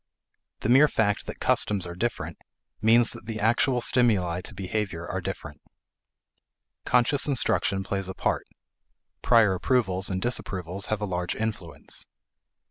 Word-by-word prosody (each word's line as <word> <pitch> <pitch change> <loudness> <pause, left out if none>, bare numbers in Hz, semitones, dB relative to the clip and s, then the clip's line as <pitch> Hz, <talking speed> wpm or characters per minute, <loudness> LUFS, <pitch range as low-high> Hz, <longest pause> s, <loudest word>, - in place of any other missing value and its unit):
The 110 - -1
mere 135 +5 +7
fact 105 -6 0
that - - -7
customs 100 -4 +1
are 85 - -6
different 120 +7 -3 0.4
means 115 +2 +5
that 105 - -8
the 110 -2 -4
actual 120 +4 +2
stimuli 100 -9 +2
to 105 - -10
behavior 95 -3 -3
are - - -3
different. - - -7 1.2
Conscious 125 +4 +3
instruction 100 -7 +1
plays 95 0 -3
a 95 - -6
part; - - -1 0.7
prior 115 -5 +4
approvals 95 -2 0
and 95 -1 -2
disapprovals 95 -4 -2
have 110 -1 -2
a - - 0
large 90 -2 -2
influence. 105 -7 -3
105 Hz, 135 wpm, -26 LUFS, 95-120 Hz, 1.2 s, mere